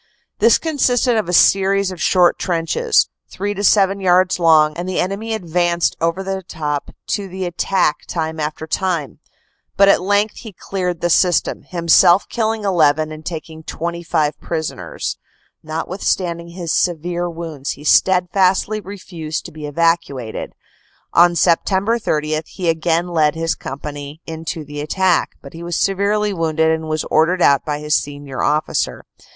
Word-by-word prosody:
This 230 +1 +5
consisted 255 -6 +1
of 215 -5 -1
a - - 0
series 195 +2 +4
of 180 -3 -8
short 180 -2 +3
trenches, 180 - +1 0.2
three 205 +2 -3
to 205 0 -5
seven 195 -1 +3
yards 185 -1 +3
long, 155 -2 +4
and 175 +2 -4
the 185 - -1
enemy 210 +4 -2
ad 215 - -6
vanced 175 0 +1
over 170 +3 0
the 190 0 -3
top 150 -4 -4 0.2
to 200 -2 -1
the 190 0 -5
attack 175 -2 0
time 160 -1 -3
after 150 +1 -3
time 170 -4 -2 0.6
But 200 0 +6
at 195 - +4
length 205 +3 +1
he 220 -4 -10
cleared 180 -2 -4
the 175 - +1
system, 180 +1 +2
himself 175 +1 +4
killing 220 -2 -1
1 195 -2 0
1 155 -1 +3
and 155 0 -9
taking 160 -1 -7
25 165 -2 -2
prison 160 -2 -3
ers. - - -5 0.4
Notwithstanding 170 +1 -2
his 170 -1 -4
severe 175 0 -1
wounds 160 -5 -5
he 145 - -12
steadfastly 190 +5 +2
refused 175 -5 -6
to 175 - -8
be 155 -1 -7
evacuated. 145 -7 -1 0.6
On 175 +1 +6
Sept. 190 +7 +2
30 155 -3 -1
he 180 -3 -3
again 165 +1 +1
led 155 -3 +1
his 165 0 0
company 145 +2 -7
in 160 0 -7
to 160 -1 -4
the 145 0 -6
attack, 180 +3 +1
but 140 - -11
was 170 +1 -5
severely 200 +2 +1
wounded 160 -2 +1
and 160 0 -2
was 155 0 -1
ordered 170 +3 +3
out 140 -1 +4
by 150 -1 -2
his 150 0 0
senior 145 -2 -4
officer. 150 +1 -1
170 Hz, 155 wpm, -19 LUFS, 155-190 Hz, 0.6 s, But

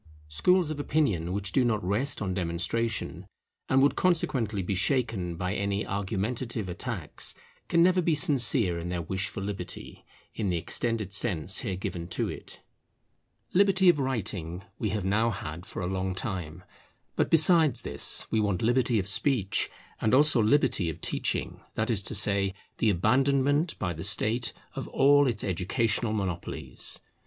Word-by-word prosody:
Schools 170 - +2
of 150 - -5
opinion 110 - 0
which 100 0 -2
do 130 - +3
not 110 -3 0
rest 110 +6 -1
on 95 -2 -2
demonstration, 90 +6 -2 0.4
and 135 +1 +4
would 145 - +3
consequently 125 - 0
be 95 - -2
shaken 105 - 0
by 90 +2 -2
any 100 0 -1
argumentative 105 +3 -3
attacks, 90 - -4 0.3
can 170 0 +4
never 180 +1 +4
be 165 -2 +1
sincere 120 - +2
in 85 - -5
their 90 -1 -3
wish 95 +3 -1
for 95 - -6
Liberty, 95 -3 -6 0.3
in 105 -4 -2
the 90 - 0
extended 110 +3 -2
sense 95 -4 +3
here 100 -7 -3
given 85 -2 -5
to 90 - -2
it. - - -9 0.9
Liberty 190 -1 +4
of 165 -4 +4
writing 100 -9 -3 0.2
we 110 - -1
have 105 -3 -2
now 110 +4 +2
had 90 -4 -6
for - - -5
a - - -1
long 95 0 -2
time. 90 -5 -4 0.5
But - - +1
besides 160 -4 +4
this - - +1
we 110 - +2
want 100 -3 0
liberty 120 0 +2
of 95 -2 -1
speech; 105 -1 +2 0.3
and 110 +3 +2
also 145 -3 +5
liberty 105 - +2
of 80 - -6
teaching; - - -2
that 110 +2 0
is 105 -4 +2
to 110 - -1
say, 100 -1 +2 0.2
the 110 - +3
abandonment 135 - +2
by 90 -4 -2
the 80 - -7
State 110 +5 +1 0.2
of - - -5
all 145 +1 +4
its 115 -4 -2
educational 105 +5 0
monopolies. 95 -5 -3
105 Hz, 160 wpm, -28 LUFS, 95-130 Hz, 0.9 s, also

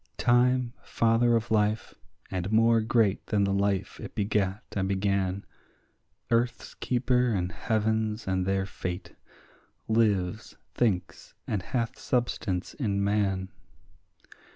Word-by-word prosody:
Time, 125 0 +3
father 115 +1 +2
of 115 0 -1
life, 105 0 +1 0.4
and 95 +1 -2
more 115 +1 +4
great 110 -2 +2
than 105 -2 +2
the 100 0 +1
life 100 -1 0
it - - -8
begat 100 +1 0
and 95 -1 -1
began, 100 -1 0 0.9
Earth's 120 +1 0
keeper 125 0 +1
and 90 -4 -1
heaven's 110 +1 -1
and 95 -1 0
their 95 0 +1
fate, 90 -1 -6 0.7
lives, 110 -3 +1 0.2
thinks, 105 -7 -1
and 105 -3 -1
hath 115 +4 -3
substance 115 -7 -1
in 100 -7 -1
man. 100 -2 0
105 Hz, 115 wpm, -28 LUFS, 95-115 Hz, 0.9 s, more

